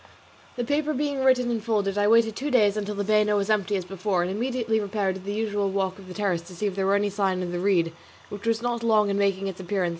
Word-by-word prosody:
The 245 Hz, -, -2 dB
paper 295 Hz, +4 st, 0 dB
being 285 Hz, -1 st, -1 dB
written 250 Hz, -2 st, +3 dB
and 225 Hz, -3 st, -2 dB
folded 205 Hz, -3 st, 0 dB
I 205 Hz, 0 st, +2 dB
waited 225 Hz, 0 st, +4 dB
two 285 Hz, +6 st, -3 dB
days 215 Hz, -6 st, +3 dB
until 210 Hz, 0 st, -3 dB
the 205 Hz, -, -1 dB
bano 210 Hz, 0 st, +3 dB
was 200 Hz, +1 st, 0 dB
empty 210 Hz, -1 st, +1 dB
as 185 Hz, -2 st, -2 dB
before, 190 Hz, 0 st, -1 dB
and 180 Hz, -, -2 dB
immediately 230 Hz, +1 st, -1 dB
repaired 200 Hz, -2 st, -1 dB
to 190 Hz, -, -8 dB
the 200 Hz, +2 st, -5 dB
usual 205 Hz, -2 st, -1 dB
walk 190 Hz, 0 st, -2 dB
on 190 Hz, -, -13 dB
the 180 Hz, -, -9 dB
terrace 195 Hz, -5 st, 0 dB
to 180 Hz, +2 st, -13 dB
see 210 Hz, -, -3 dB
if 200 Hz, -, 0 dB
there 195 Hz, -1 st, 0 dB
were 200 Hz, -, +3 dB
any 205 Hz, 0 st, +1 dB
sign 190 Hz, -2 st, 0 dB
of 175 Hz, -, -4 dB
the 175 Hz, -, -3 dB
reed, 175 Hz, -4 st, +2 dB, 0.4 s
which 205 Hz, +2 st, -7 dB
was 230 Hz, 0 st, +1 dB
not 240 Hz, -1 st, -1 dB
long 215 Hz, -3 st, +3 dB
in 200 Hz, -, 0 dB
making 195 Hz, -1 st, +1 dB
its 195 Hz, -2 st, -5 dB
appearance. 185 Hz, -1 st, -1 dB
205 Hz, 270 wpm, -25 LUFS, 195-225 Hz, 0.4 s, waited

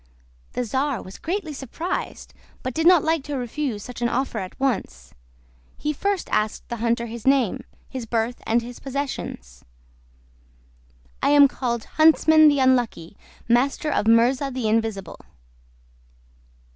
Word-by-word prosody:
The 250 Hz, -, -1 dB
czar 265 Hz, +2 st, -1 dB
was 185 Hz, -, -11 dB
greatly 345 Hz, -2 st, -3 dB
surprised, 285 Hz, +7 st, -5 dB, 0.3 s
but 255 Hz, -, -3 dB
did 320 Hz, +4 st, +1 dB
not 355 Hz, -4 st, +6 dB
like 320 Hz, -2 st, +1 dB
to 290 Hz, -2 st, -3 dB
refuse 245 Hz, -3 st, -3 dB
such 245 Hz, -1 st, -9 dB
an 240 Hz, -, +1 dB
offer 245 Hz, -2 st, -1 dB
at 185 Hz, -1 st, -8 dB
once; 190 Hz, -, -2 dB, 0.6 s
he 300 Hz, 0 st, -2 dB
first 400 Hz, +4 st, -1 dB
asked 215 Hz, 0 st, -1 dB
the 235 Hz, -, -4 dB
hunter 235 Hz, +1 st, 0 dB
his 235 Hz, +1 st, -7 dB
name, 265 Hz, -6 st, +2 dB, 0.2 s
his 255 Hz, -4 st, -6 dB
birth 230 Hz, +2 st, -1 dB
and 230 Hz, +1 st, +2 dB
his 245 Hz, +1 st, -9 dB
possessions. 265 Hz, -, -5 dB, 1.6 s
"I -, -, +2 dB
am 290 Hz, -1 st, +7 dB
called 235 Hz, -4 st, -3 dB
Huntsman 315 Hz, 0 st, +5 dB
the 290 Hz, -1 st, +4 dB
Unlucky, 245 Hz, -10 st, +1 dB, 0.3 s
Master 270 Hz, +5 st, +1 dB
of 215 Hz, -, 0 dB
Murza 245 Hz, +5 st, +3 dB
the 250 Hz, -3 st, -2 dB
Invisible." 215 Hz, -4 st, -1 dB
250 Hz, 140 wpm, -23 LUFS, 225-285 Hz, 1.6 s, am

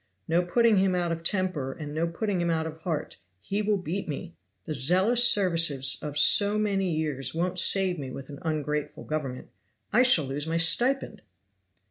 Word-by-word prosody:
No 170 Hz, +2 st, +1 dB
putting 225 Hz, +4 st, +2 dB
him 190 Hz, -1 st, +2 dB
out 175 Hz, -1 st, -1 dB
of 165 Hz, 0 st, -5 dB
temper 170 Hz, -8 st, -2 dB
and 145 Hz, -1 st, -8 dB
no 165 Hz, +2 st, -1 dB
putting 185 Hz, +2 st, -3 dB
him 170 Hz, -, -1 dB
out 160 Hz, -1 st, -1 dB
of 160 Hz, 0 st, -7 dB
heart! 160 Hz, -2 st, -5 dB, 0.2 s
He 200 Hz, -, -3 dB
will 210 Hz, 0 st, 0 dB
beat 185 Hz, +1 st, -5 dB
me! 135 Hz, -, -6 dB, 0.3 s
The -, -, -4 dB
zealous 190 Hz, -, +3 dB
services 165 Hz, -8 st, +3 dB
of 150 Hz, -1 st, -6 dB
so 205 Hz, +7 st, +5 dB
many 200 Hz, -3 st, -1 dB
years 150 Hz, -3 st, -3 dB
won't 180 Hz, +2 st, -1 dB
save 185 Hz, -1 st, +4 dB
me 135 Hz, -2 st, -6 dB
with 135 Hz, +1 st, -9 dB
an 140 Hz, -1 st, -10 dB
ungrateful 150 Hz, -2 st, -4 dB
Government. 140 Hz, -5 st, -5 dB, 0.4 s
I 240 Hz, -, +5 dB
shall 250 Hz, -, +4 dB
lose 140 Hz, +3 st, -5 dB
my 165 Hz, +1 st, -1 dB
stipend!" 245 Hz, +11 st, +1 dB
165 Hz, 180 wpm, -26 LUFS, 150-195 Hz, 0.4 s, so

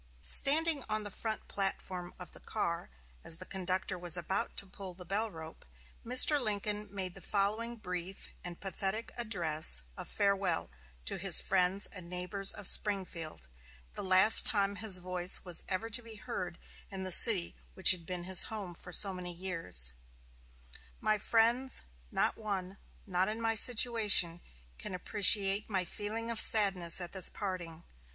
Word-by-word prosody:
Standing 295 Hz, -, +6 dB
on 215 Hz, 0 st, -3 dB
the 205 Hz, -, -8 dB
front 220 Hz, +2 st, -6 dB
platform 185 Hz, -2 st, -5 dB
of 180 Hz, -, -12 dB
the -, -, -15 dB
car, 170 Hz, -, -5 dB, 0.3 s
as 165 Hz, -, 0 dB
the 185 Hz, -, -11 dB
conductor 185 Hz, 0 st, -4 dB
was 175 Hz, 0 st, +1 dB
about 175 Hz, +2 st, -4 dB
to 200 Hz, -, -3 dB
pull 190 Hz, -1 st, -11 dB
the 180 Hz, 0 st, -14 dB
bell 210 Hz, +6 st, -3 dB
rope, 160 Hz, -3 st, -13 dB, 0.4 s
Mr. 255 Hz, +5 st, +2 dB
Lincoln 210 Hz, -1 st, -2 dB
made 190 Hz, -3 st, -6 dB
the 195 Hz, -, -14 dB
following 215 Hz, +5 st, -3 dB
brief 180 Hz, -3 st, -8 dB, 0.2 s
and 175 Hz, -1 st, -9 dB
pathetic 195 Hz, +3 st, -3 dB
address 160 Hz, -, 0 dB
of -, -, -9 dB
farewell 195 Hz, -, -3 dB, 0.3 s
to -, -, -4 dB
his -, -, +2 dB
friends 190 Hz, +1 st, 0 dB
and 180 Hz, -3 st, -10 dB
neighbors 180 Hz, +2 st, +2 dB
of 205 Hz, -, -8 dB
Springfield 180 Hz, -, +1 dB, 0.5 s
the -, -, -8 dB
last 190 Hz, +3 st, +5 dB
time 200 Hz, -1 st, +1 dB
his 200 Hz, -1 st, +2 dB
voice 180 Hz, 0 st, -1 dB
was 175 Hz, -2 st, -2 dB
ever 195 Hz, +4 st, -4 dB
to 245 Hz, -, +2 dB
be 225 Hz, -1 st, -12 dB
heard 205 Hz, -7 st, -8 dB, 0.3 s
in 190 Hz, -1 st, -8 dB
the 185 Hz, -, -5 dB
city 185 Hz, -3 st, +6 dB, 0.2 s
which 190 Hz, -, +5 dB
had 180 Hz, -3 st, -3 dB
been 180 Hz, -1 st, -6 dB
his 185 Hz, 0 st, +6 dB
home 205 Hz, -5 st, -8 dB
for 180 Hz, -, -5 dB
so 195 Hz, +2 st, +6 dB
many 180 Hz, -1 st, -8 dB
years: 165 Hz, -, +1 dB, 1.1 s
"My 215 Hz, -1 st, -2 dB
friends: 235 Hz, +5 st, 0 dB, 0.3 s
No -, -, -1 dB
one, 195 Hz, -3 st, -7 dB, 0.3 s
not 185 Hz, -1 st, -2 dB
in 215 Hz, +1 st, -6 dB
my 225 Hz, 0 st, -1 dB
situation, 215 Hz, -7 st, +3 dB, 0.4 s
can 185 Hz, -, -6 dB
appreciate 200 Hz, +2 st, +2 dB
my 190 Hz, -3 st, -3 dB
feeling 220 Hz, +5 st, -6 dB
of 230 Hz, -, 0 dB
sadness 190 Hz, -6 st, +4 dB
at 175 Hz, -1 st, -6 dB
this 190 Hz, -2 st, +4 dB
parting. 175 Hz, -5 st, -8 dB
190 Hz, 160 wpm, -30 LUFS, 180-215 Hz, 1.1 s, Standing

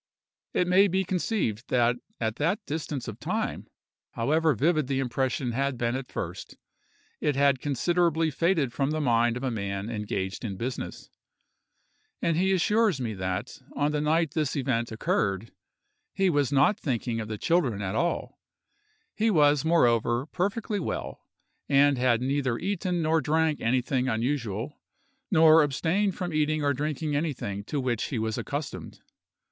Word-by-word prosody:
It 180 Hz, -, +2 dB
may 190 Hz, +3 st, +5 dB
be 190 Hz, +1 st, +1 dB
conceived 180 Hz, -, -2 dB
that 120 Hz, -1 st, +3 dB, 0.2 s
at 110 Hz, -1 st, -2 dB
that 185 Hz, +8 st, 0 dB
distance 150 Hz, -3 st, -4 dB
of -, -, -7 dB
time, -, -, -3 dB, 0.5 s
however 155 Hz, +5 st, +2 dB
vivid 155 Hz, -, +1 dB
the 135 Hz, -1 st, -1 dB
impression 130 Hz, -1 st, -1 dB
had 135 Hz, +2 st, -1 dB
been 120 Hz, +1 st, 0 dB
at 130 Hz, -1 st, -6 dB
first, -, -, -6 dB, 0.6 s
it 150 Hz, -, 0 dB
had 140 Hz, -1 st, +3 dB
considerably 165 Hz, +3 st, +1 dB
faded 160 Hz, -5 st, +1 dB
from 140 Hz, -1 st, 0 dB
the 155 Hz, +1 st, -1 dB
mind 120 Hz, -3 st, +2 dB
of 125 Hz, -, -6 dB
a 130 Hz, -, 0 dB
man 100 Hz, 0 st, -3 dB
engaged 100 Hz, -3 st, -3 dB
in 100 Hz, -5 st, -4 dB
business; 120 Hz, +4 st, -5 dB, 1.1 s
and 165 Hz, -, +1 dB
he 190 Hz, +3 st, +2 dB
assures 210 Hz, -2 st, +2 dB
me 115 Hz, -4 st, -2 dB
that, 95 Hz, +4 st, -4 dB, 0.2 s
on 145 Hz, +1 st, +1 dB
the 150 Hz, 0 st, -1 dB
night 160 Hz, 0 st, +2 dB
this 155 Hz, -3 st, -1 dB
event 125 Hz, -5 st, -1 dB
occurred, 105 Hz, -1 st, -1 dB, 0.6 s
he 195 Hz, -2 st, +3 dB
was 145 Hz, -3 st, +1 dB
not 145 Hz, +10 st, +3 dB
thinking 120 Hz, -3 st, -2 dB
of 110 Hz, -, -4 dB
the 110 Hz, -1 st, -4 dB
children 135 Hz, -, +1 dB
at 95 Hz, -1 st, -3 dB
all; 170 Hz, +10 st, -2 dB, 0.7 s
he 225 Hz, 0 st, +1 dB
was, 150 Hz, -6 st, +4 dB
moreover, 120 Hz, -6 st, +2 dB
perfectly 200 Hz, +5 st, -2 dB
well, 175 Hz, -, -4 dB, 0.5 s
and 140 Hz, -1 st, +4 dB
had 120 Hz, -2 st, +2 dB
neither 130 Hz, -3 st, 0 dB
eaten 180 Hz, -1 st, -1 dB
nor 160 Hz, +1 st, +2 dB
drank 155 Hz, +1 st, +1 dB
anything 125 Hz, +2 st, +1 dB
unusual, 115 Hz, +1 st, -2 dB, 0.5 s
nor 160 Hz, -3 st, +7 dB
abstained 170 Hz, +7 st, +1 dB
from 175 Hz, -2 st, -4 dB
eating 155 Hz, 0 st, +1 dB
or 145 Hz, 0 st, +2 dB
drinking 150 Hz, +2 st, -2 dB
anything 135 Hz, -10 st, -2 dB
to 145 Hz, +7 st, -3 dB
which 125 Hz, -4 st, -1 dB
he 130 Hz, -, -3 dB
was 110 Hz, 0 st, -1 dB
accustomed. 145 Hz, 0 st, -5 dB
140 Hz, 155 wpm, -27 LUFS, 120-160 Hz, 1.1 s, nor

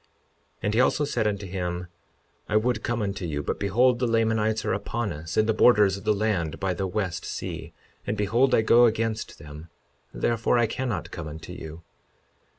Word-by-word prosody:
52:11 -, -, -37 dB, 0.6 s
And 105 Hz, -, 0 dB
he 115 Hz, -, +4 dB
also 145 Hz, +3 st, +2 dB
said 140 Hz, -6 st, 0 dB
unto 100 Hz, -1 st, -2 dB
him, 90 Hz, -1 st, -4 dB, 0.6 s
I -, -, 0 dB
would 115 Hz, 0 st, +1 dB
come 120 Hz, -3 st, -1 dB
unto 100 Hz, -1 st, -3 dB
you, 75 Hz, -4 st, -3 dB
but -, -, -3 dB
behold, 120 Hz, +5 st, +3 dB
the 125 Hz, -, +1 dB
Lamanites 110 Hz, -1 st, +1 dB
are -, -, +1 dB
upon 105 Hz, +2 st, -2 dB
us 80 Hz, +3 st, -7 dB
in 110 Hz, -, +4 dB
the 110 Hz, -, +2 dB
borders 105 Hz, -4 st, +5 dB
of 100 Hz, -, -10 dB
the 105 Hz, -, +4 dB
land 100 Hz, -7 st, -1 dB
by 95 Hz, -1 st, 0 dB
the 95 Hz, +2 st, -2 dB
west 90 Hz, -2 st, -2 dB
sea; -, -, -5 dB, 0.4 s
and 105 Hz, -, -1 dB
behold, 120 Hz, +6 st, +3 dB
I 110 Hz, -, +3 dB
go 120 Hz, +2 st, +6 dB
against 110 Hz, -1 st, -2 dB
them, 75 Hz, +3 st, -11 dB, 0.4 s
therefore 115 Hz, +1 st, +1 dB
I 120 Hz, -, +4 dB
cannot 120 Hz, 0 st, -3 dB
come 85 Hz, -3 st, -6 dB
unto 80 Hz, +1 st, -8 dB
you. 80 Hz, +1 st, -9 dB
105 Hz, 195 wpm, -26 LUFS, 90-115 Hz, 0.6 s, go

